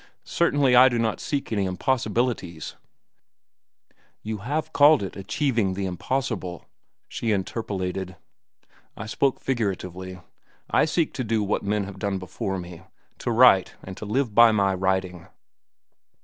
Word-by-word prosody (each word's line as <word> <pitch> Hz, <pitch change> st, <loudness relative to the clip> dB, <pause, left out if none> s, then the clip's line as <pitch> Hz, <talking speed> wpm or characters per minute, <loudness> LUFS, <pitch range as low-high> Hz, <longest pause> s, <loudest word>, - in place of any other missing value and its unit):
Certainly 145 Hz, -6 st, +2 dB
I 130 Hz, +2 st, +8 dB
do 120 Hz, -, -1 dB
not 115 Hz, -2 st, 0 dB
seek 140 Hz, -4 st, -3 dB
any 100 Hz, -3 st, 0 dB
impossibilities—" 110 Hz, -, -1 dB, 1.5 s
"You 110 Hz, -1 st, -4 dB
have 150 Hz, +8 st, -3 dB
called 145 Hz, -3 st, +6 dB
it 95 Hz, -, -6 dB
'achieving 110 Hz, -1 st, -1 dB
the 100 Hz, 0 st, -3 dB
impossible,'" 95 Hz, -1 st, -3 dB, 0.4 s
she 115 Hz, -, -3 dB
interpolated. 95 Hz, -2 st, -3 dB, 0.8 s
"I -, -, -6 dB
spoke 130 Hz, +4 st, 0 dB
figuratively. 95 Hz, -6 st, -3 dB, 0.5 s
I -, -, +4 dB
seek 160 Hz, 0 st, 0 dB
to 130 Hz, -, -3 dB
do 110 Hz, -2 st, 0 dB
what 105 Hz, +1 st, -1 dB
men 105 Hz, 0 st, -1 dB
have 100 Hz, 0 st, -9 dB
done 100 Hz, -1 st, -1 dB
before 95 Hz, +1 st, -4 dB
me—to 90 Hz, +6 st, -8 dB
write 115 Hz, -6 st, +5 dB
and 95 Hz, -, -8 dB
to -, -, -7 dB
live 115 Hz, +2 st, -1 dB
by 115 Hz, +1 st, +7 dB
my 100 Hz, -2 st, +2 dB
writing." 95 Hz, -2 st, -2 dB
105 Hz, 135 wpm, -24 LUFS, 95-125 Hz, 1.5 s, I